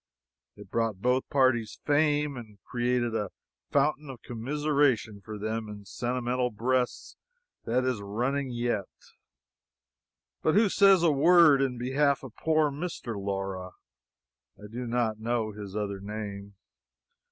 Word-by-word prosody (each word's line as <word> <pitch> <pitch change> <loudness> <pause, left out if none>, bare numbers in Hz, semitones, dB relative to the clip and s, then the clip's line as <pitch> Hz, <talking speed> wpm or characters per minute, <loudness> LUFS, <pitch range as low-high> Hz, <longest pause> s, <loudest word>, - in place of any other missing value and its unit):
It 105 -2 -14
brought 115 -4 0
both 125 +4 +1
parties 130 -6 +2
fame, 150 -1 +2
and 110 -4 -10
created 120 -1 0
a 105 -3 -1 0.4
fountain 145 +1 +1
of 130 -3 -9
commiseration 130 -3 0
for 110 +1 -7
them 110 +1 -3
in 105 -1 -9
sentimental 125 +2 -1
breasts 125 +3 -1 0.5
that 125 +2 +1
is 125 -5 -1
running 125 +7 -1
yet. 120 -5 -2 1.5
But 155 - +2
who 210 0 +5
says 195 -2 +5
a 165 - +5
word 150 -1 +6
in 130 -2 0
behalf 135 +3 +1
of 125 -4 -10
poor 155 -2 +2
Mr. 145 -6 -5
Laura? 95 -2 -4 0.8
(I 105 - -12
do 120 +1 -5
not 115 -2 0
know 115 -1 -1
his 100 -1 -8
other 100 -2 -2
name.) 100 -1 -7
120 Hz, 130 wpm, -28 LUFS, 105-140 Hz, 1.5 s, word